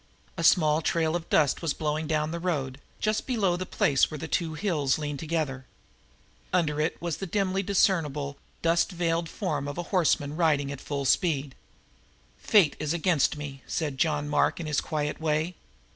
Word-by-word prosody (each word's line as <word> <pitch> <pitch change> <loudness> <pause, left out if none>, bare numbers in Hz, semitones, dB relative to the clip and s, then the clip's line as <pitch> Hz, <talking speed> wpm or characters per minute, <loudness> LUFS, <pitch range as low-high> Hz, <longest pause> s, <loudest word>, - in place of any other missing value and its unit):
A 165 - -4
small 155 -2 +4
trail 160 0 +1
of 170 -1 -4
dust 145 -4 +3
was 165 -4 -1
blowing 155 0 -2
down 155 0 0
the 170 - -3
road, 140 -7 -2 0.2
just 215 0 0
below 205 -9 +1
the 185 +1 -4
place 135 -2 +2
where 155 - -6
the 160 - -5
two 160 -1 -1
hills 155 -6 0
leaned 145 -2 -4
together. 150 -5 -2 0.8
Under 150 -4 +1
it 155 - -1
was 170 -3 -3
the 195 - -5
dimly 195 +1 0
discernible, 155 -8 +1 0.3
dust 170 +2 +2
veiled 170 -1 -1
form 150 -9 -3
of 145 - -5
a 175 - -2
horseman 155 -5 +2
riding 150 -4 +2
at 140 - -7
full 140 -1 -3
speed. 140 -3 +1 0.9
"Fate 195 -8 +4
is 155 +2 -1
against 165 -4 +2
me," 140 -2 -7
said 145 -5 -2
John 150 -2 +1
Mark 150 - +1
in 170 - -4
his 150 -2 0
quiet 150 -1 -3
way. 160 +2 0
155 Hz, 175 wpm, -27 LUFS, 145-170 Hz, 0.9 s, small